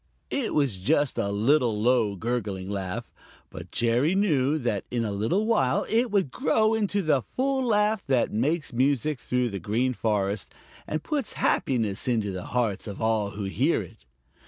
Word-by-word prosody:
It 270 Hz, -5 st, -1 dB
was 140 Hz, -9 st, +1 dB
just 145 Hz, +6 st, +1 dB
a 100 Hz, -3 st, 0 dB
little 115 Hz, +1 st, +2 dB
low, 115 Hz, -3 st, +2 dB
gurgling 100 Hz, -3 st, -3 dB
laugh, 95 Hz, -2 st, -4 dB, 0.4 s
but -, -, -9 dB
Jerry 120 Hz, +9 st, +1 dB
knew 155 Hz, -8 st, +2 dB
that 120 Hz, -8 st, -1 dB
in 120 Hz, -2 st, -1 dB
a 105 Hz, -, -2 dB
little 115 Hz, -, 0 dB
while 135 Hz, -, +2 dB
it 235 Hz, +2 st, +2 dB
would 195 Hz, -10 st, +1 dB
grow 220 Hz, -4 st, +2 dB
into 205 Hz, -2 st, 0 dB
the 150 Hz, -5 st, +2 dB
full 265 Hz, -, -1 dB
laugh 210 Hz, -3 st, +2 dB
that 130 Hz, -3 st, +1 dB
makes 145 Hz, +6 st, 0 dB
music 135 Hz, +2 st, +1 dB
through 125 Hz, -1 st, -1 dB
the 100 Hz, -, -4 dB
Green 115 Hz, +8 st, 0 dB
Forest 105 Hz, -3 st, -1 dB, 0.3 s
and 155 Hz, 0 st, -3 dB
puts 295 Hz, -4 st, -2 dB
happiness 115 Hz, -3 st, 0 dB
into 110 Hz, -5 st, 0 dB
the 90 Hz, -1 st, -6 dB
hearts 115 Hz, -6 st, -1 dB
of 100 Hz, -, -6 dB
all 110 Hz, -2 st, +1 dB
who 105 Hz, -, -3 dB
hear 120 Hz, +6 st, +1 dB
it. 90 Hz, -, -15 dB
125 Hz, 170 wpm, -26 LUFS, 105-155 Hz, 0.4 s, little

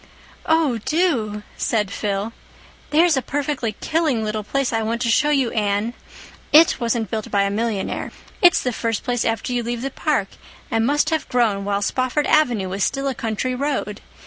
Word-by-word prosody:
"Oh, 315 Hz, -7 st, +2 dB
do," 230 Hz, -, 0 dB
said 210 Hz, -4 st, 0 dB
Phil. 205 Hz, +2 st, -2 dB, 0.6 s
"There's 325 Hz, +1 st, +4 dB
a 265 Hz, -, +1 dB
perfectly 280 Hz, -5 st, -2 dB
killing 315 Hz, -8 st, +1 dB
little 215 Hz, 0 st, -2 dB
place 270 Hz, +4 st, -1 dB
I 225 Hz, -, +1 dB
want 225 Hz, +2 st, -1 dB
to 235 Hz, -2 st, +1 dB
show 295 Hz, +5 st, +3 dB
you, 270 Hz, -5 st, +2 dB
Anne. 210 Hz, +1 st, 0 dB, 0.6 s
it 320 Hz, 0 st, +6 dB
wasn't 230 Hz, -2 st, -1 dB
built 220 Hz, -2 st, -3 dB
by 200 Hz, -1 st, +2 dB
a 200 Hz, -, 0 dB
millionaire. 215 Hz, -1 st, -2 dB, 0.3 s
It's 355 Hz, -1 st, +5 dB
the 250 Hz, -, -1 dB
first 225 Hz, -1 st, -2 dB
place 245 Hz, -2 st, 0 dB
after 225 Hz, +2 st, -1 dB
you 245 Hz, -, 0 dB
leave 235 Hz, +1 st, -4 dB
the 275 Hz, -, -3 dB
park, 260 Hz, -10 st, 0 dB, 0.4 s
and 225 Hz, +1 st, +2 dB
must 295 Hz, +3 st, +2 dB
have 320 Hz, -, -1 dB
grown 220 Hz, -6 st, +1 dB
while 200 Hz, 0 st, 0 dB
Spofford 255 Hz, +6 st, 0 dB
Avenue 240 Hz, -11 st, +2 dB
was 195 Hz, +1 st, -2 dB
still 275 Hz, 0 st, -1 dB
a 270 Hz, -, 0 dB
country 230 Hz, +2 st, -2 dB
road. 255 Hz, -6 st, -2 dB
235 Hz, 180 wpm, -21 LUFS, 215-275 Hz, 0.6 s, it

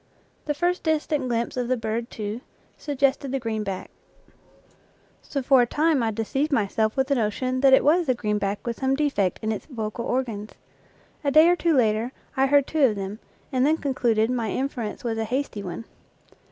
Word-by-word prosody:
The 295 Hz, -, -1 dB
first 355 Hz, +3 st, 0 dB
dis 315 Hz, -2 st, +1 dB
tant 285 Hz, -4 st, -1 dB
glimpse 235 Hz, 0 st, -1 dB
of 250 Hz, -1 st, -1 dB
the 255 Hz, +1 st, +1 dB
bird, 225 Hz, +1 st, -3 dB
too, 215 Hz, +2 st, -5 dB, 0.3 s
suggested 275 Hz, -2 st, 0 dB
the 270 Hz, -, -1 dB
green 220 Hz, -3 st, -2 dB
back, 195 Hz, -2 st, -5 dB, 1.3 s
so 275 Hz, -2 st, -4 dB
for 260 Hz, 0 st, +5 dB
a 240 Hz, -, +2 dB
time 305 Hz, +1 st, +2 dB
I 225 Hz, -, +1 dB
deceived 270 Hz, +8 st, -1 dB
myself 220 Hz, -2 st, +1 dB
with 265 Hz, -, +3 dB
the 280 Hz, -, 0 dB
notion 255 Hz, +2 st, -1 dB
that 270 Hz, -1 st, +6 dB
it -, -, +2 dB
was 330 Hz, +2 st, +3 dB
the 255 Hz, -, +2 dB
green 210 Hz, -3 st, -1 dB
back 200 Hz, 0 st, -3 dB
with 235 Hz, -1 st, -3 dB
some 265 Hz, 0 st, +1 dB
defect 275 Hz, -11 st, 0 dB
in 220 Hz, -, 0 dB
its 215 Hz, -, -5 dB
vocal 235 Hz, -3 st, -4 dB
organs. 225 Hz, -5 st, -2 dB, 0.7 s
A 285 Hz, -, +2 dB
day 310 Hz, +3 st, +7 dB
or 355 Hz, -, +4 dB
two 335 Hz, -2 st, +1 dB
later 225 Hz, 0 st, +1 dB, 0.2 s
I 270 Hz, 0 st, +3 dB
heard 285 Hz, 0 st, +4 dB
two 310 Hz, 0 st, 0 dB
of 220 Hz, -5 st, +2 dB
them, 200 Hz, +2 st, -5 dB, 0.3 s
and 255 Hz, -2 st, +1 dB
then 310 Hz, +3 st, +3 dB
concluded 240 Hz, -6 st, +1 dB
my 235 Hz, -3 st, -1 dB
inference 250 Hz, -4 st, -3 dB
was 225 Hz, -2 st, -2 dB
a 220 Hz, -, -1 dB
hasty 250 Hz, -2 st, -2 dB
one. 185 Hz, +4 st, -6 dB
250 Hz, 200 wpm, -25 LUFS, 220-280 Hz, 1.3 s, day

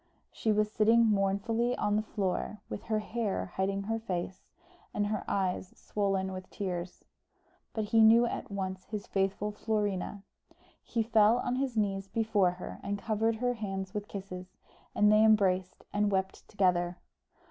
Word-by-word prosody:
She 220 Hz, -, 0 dB
was 210 Hz, 0 st, +2 dB
sitting 225 Hz, +2 st, +5 dB
mournfully 220 Hz, +4 st, +1 dB
on 205 Hz, 0 st, +1 dB
the 215 Hz, -, +2 dB
floor, 210 Hz, -1 st, -2 dB
with 205 Hz, -, -6 dB
her 220 Hz, -, 0 dB
hair 215 Hz, -3 st, -2 dB
hiding 195 Hz, +1 st, 0 dB
her 225 Hz, +2 st, -1 dB
face, 185 Hz, -4 st, -4 dB, 0.5 s
and 205 Hz, -, +1 dB
her 210 Hz, 0 st, -2 dB
eyes 185 Hz, -1 st, -1 dB
swollen 195 Hz, -2 st, -1 dB
with 185 Hz, 0 st, -7 dB
tears; 180 Hz, -2 st, -5 dB, 0.7 s
but 220 Hz, -, -2 dB
he 225 Hz, +2 st, +3 dB
knew 225 Hz, +2 st, +7 dB
at -, -, -4 dB
once 190 Hz, -2 st, -4 dB
his 210 Hz, -2 st, -5 dB
faithful 195 Hz, +2 st, -1 dB
Florina. 205 Hz, -2 st, -2 dB, 0.6 s
He 230 Hz, -1 st, -1 dB
fell 220 Hz, 0 st, +5 dB
on 250 Hz, 0 st, -1 dB
his 260 Hz, -3 st, -1 dB
knees 195 Hz, -2 st, 0 dB
before 205 Hz, -3 st, +2 dB
her 180 Hz, -, -8 dB, 0.2 s
covered 220 Hz, +2 st, 0 dB
her 245 Hz, +2 st, 0 dB
hands 195 Hz, -4 st, -4 dB
with 210 Hz, -1 st, -4 dB
kisses, 185 Hz, -2 st, -8 dB, 0.4 s
and 210 Hz, 0 st, +5 dB
they 215 Hz, +1 st, +6 dB
embraced 190 Hz, -4 st, +3 dB
and 205 Hz, 0 st, +2 dB
wept 190 Hz, 0 st, -2 dB
together. 180 Hz, -3 st, +1 dB
205 Hz, 155 wpm, -31 LUFS, 190-220 Hz, 0.7 s, knew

